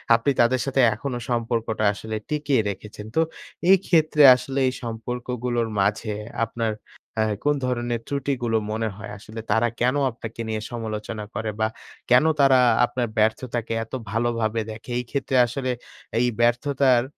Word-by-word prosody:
আপনি 120 +5 +1
তাদের 120 +2 +3
সাথে 135 -1 +2
এখনো 125 +3 -4
সম্পর্কটা 115 -2 -1
আসলে 110 +2 -6
টিকিয়ে 145 -5 +1
রেখেছেন। 105 +2 -8
তো, - - +3 0.5
এই 195 - +8
ক্ষেত্রে 155 -3 +3
আসলে 135 +2 -3
এই 130 - 0
সম্পর্কগুলোর 120 +1 -3
মাঝে 105 +3 +1 0.4
আপনার 115 -1 -2 0.4
অ্যা 110 - +3 0.2
কোন 145 0 +3
ধরনের 120 -2 -1
ত্রুটিগুলো 130 -5 -1
মনে 110 +1 -1
হয়? 105 0 -8
আসলে 110 +3 -9
তারা 110 +3 +3
কেনো 125 +4 +2
আপনাকে 115 0 -7
নিয়ে 110 -1 -2
সমালোচনা 110 -1 -4
করে? 110 -1 -2
বা 110 - +3 0.4
কেনো 130 +6 +6
তারা 135 -2 +6 0.3
আপনার 120 0 -2
ব্যর্থতাকে 115 +1 0
এত 115 - -16 0.2
ভালোভাবে 115 -1 0
দেখে? 110 +3 -10
এই - - -3
ক্ষেত্রে 135 -1 -1
আসলে 130 +2 -3 0.5
এই 125 - +3
ব্যর্থতার 125 +1 +3
120 Hz, 145 wpm, -24 LUFS, 110-130 Hz, 0.5 s, এই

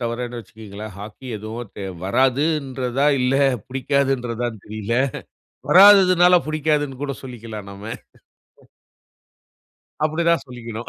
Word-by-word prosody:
தவரன்னு 120 0 -4
வச்சுக்கீங்களேன். 110 -1 -10
Hockey 105 +6 -10
எதுவும் 110 +1 -7
தெ 100 - -5 0.2
வராதுன்றதா, 135 - 0
இல்ல 125 +1 +1 0.3
புடிக்காதுன்றதானு 125 -4 -1
தெரியல. 110 +1 -4 0.8
வராதனால 185 -1 +7
புடிக்காதுன்னு 150 -3 -1
கூட 140 -1 -3
சொல்லிக்கலாம் 115 -5 -8
நம்ம. 100 +1 -11 2.2
அப்படி 155 +2 0
தான் 170 - +2
சொல்லிக்கணும். 120 -2 -8
125 Hz, 95 wpm, -21 LUFS, 110-145 Hz, 2.2 s, வராதனால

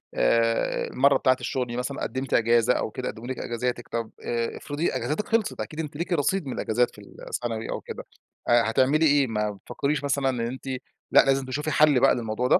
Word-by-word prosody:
،آآ، 115 - +2
المرة 140 +2 +3
بتاعة 130 -1 +3
الشغل 125 0 -2
دي 120 +1 -5
مثلًا 135 +2 -3
قدمتِ 130 0 -3
إجازة، 115 +1 +4
أو 110 - -2
كده 130 - -5
قدموا 120 +2 -8
لِك 130 - -4
إجازاتِك 120 +1 -3
طب 115 -1 -4
آآ، 115 -1 -2
افرضي 145 +4 -2
إجازاتِك 205 +8 -2
خلصت، 225 -2 0
أكيد 155 - -6
أنتِ 150 -2 -4
ليكِ 175 +3 -2
رصيد 165 +3 +1
من 130 - -3
الإجازات 120 +3 +1
في 105 - -12
ال 100 - -16 0.2
سنوي 115 -2 -3
أو - - -3
كده، - - -7 0.5
هتعملي 130 +6 +4
إيه؟ 145 -2 +4
ما 105 -2 -1
بتفكريش 140 +8 -3
مثلًا 140 -1 +1
إن 125 - -2
أنتِ 125 +3 -4 0.5
لأ، - - +8
لازم 135 -1 +2
تشوفي 150 +4 -3
حل 150 -2 +5
بقى - - +5
للموضوع 115 +1 -2
ده؟ 180 - +5
130 Hz, 205 wpm, -25 LUFS, 115-145 Hz, 0.5 s, لأ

